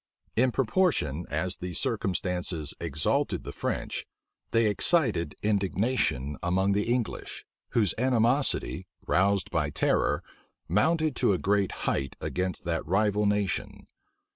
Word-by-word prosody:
In 125 +2 +3
proportion 115 - +1
as 90 +5 -1
these 90 -2 -4
circumstances 90 -3 -1
exalted 75 -3 0
the - - -6
French, - - -3 0.4
they 115 0 +3
excited 105 - +2
indignation 95 - 0
among 95 +3 +1
the 105 +3 +1
English, 120 -2 -3 0.3
whose 105 -6 +3
animosity, 125 +2 +2 0.2
roused 100 +1 +2
by 75 -2 +1
terror, 75 - +1 0.4
mounted 155 - +2
to - - +3
a - - +1
great 100 +1 +1
height 70 -1 -1
against 90 0 -3
that 85 -1 -1
rival 105 +3 +2
nation. 105 -2 -1
100 Hz, 115 wpm, -28 LUFS, 85-115 Hz, 0.4 s, In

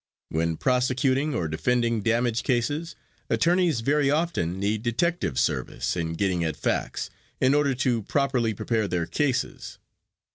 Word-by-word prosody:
When 80 0 -1
prosecuting 130 +3 +1
or 85 - -1
defending 115 +7 0
damage 115 +1 +1
cases, 145 +6 -1 0.3
attorneys 170 -6 +2
very 140 +3 +2
often 145 - 0
need 105 +2 0
detective 120 - 0
service 65 - -1
in 85 -2 -2
getting 90 -1 0
at 80 -2 -2
facts, - - -2 0.3
in 130 +1 +4
order 145 -2 +2
to 125 -3 +1
properly 125 -2 0
prepare 110 0 0
their 85 -2 -1
cases. 130 - -2
120 Hz, 135 wpm, -26 LUFS, 100-140 Hz, 0.3 s, in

